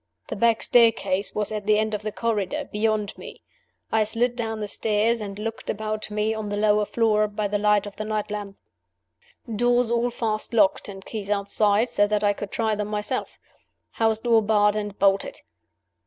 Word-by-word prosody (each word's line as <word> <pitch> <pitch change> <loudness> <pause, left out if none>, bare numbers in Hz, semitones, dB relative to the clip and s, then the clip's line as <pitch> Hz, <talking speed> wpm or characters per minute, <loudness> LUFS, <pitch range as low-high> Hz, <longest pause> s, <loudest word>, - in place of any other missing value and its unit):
The - - -3
back 230 -1 +2
staircase 220 -5 +2
was 210 0 -1
at 210 -1 -4
the 215 0 +4
end 215 0 0
of 210 - -2
the 215 0 -4
corridor, 210 -4 -2
beyond 210 -1 0
me. - - -11 0.5
I 220 -1 +3
slid 235 +3 +1
down 225 -2 -3
the 210 - -3
stairs, 220 +2 0
and 200 -1 -6
looked 225 +2 -5
about 215 0 -3
me 210 +1 0
on 220 -1 -4
the 205 - -2
lower 210 0 +3
floor, 215 -2 +2
by 210 0 -2
the 205 +1 -1
light 210 -1 +3
of 205 - -9
the 215 - -3
night 215 -1 -2
lamp. 205 -2 -5 1.0
Doors 240 +1 +2
all 235 +1 +1
fast 225 -1 -3
locked 205 -1 +3
and 195 -1 -10
keys 210 -3 -6
outside, 205 +2 +1
so 205 0 +2
that 210 0 0
I 205 0 +3
could 200 0 -6
try 220 0 0
them 210 -1 -2
myself. 210 0 -3 0.5
House 225 -1 +1
door 230 0 +3
barred 210 -1 +3
and 205 -1 -4
bolted. 200 - +1
215 Hz, 190 wpm, -24 LUFS, 205-225 Hz, 1.0 s, the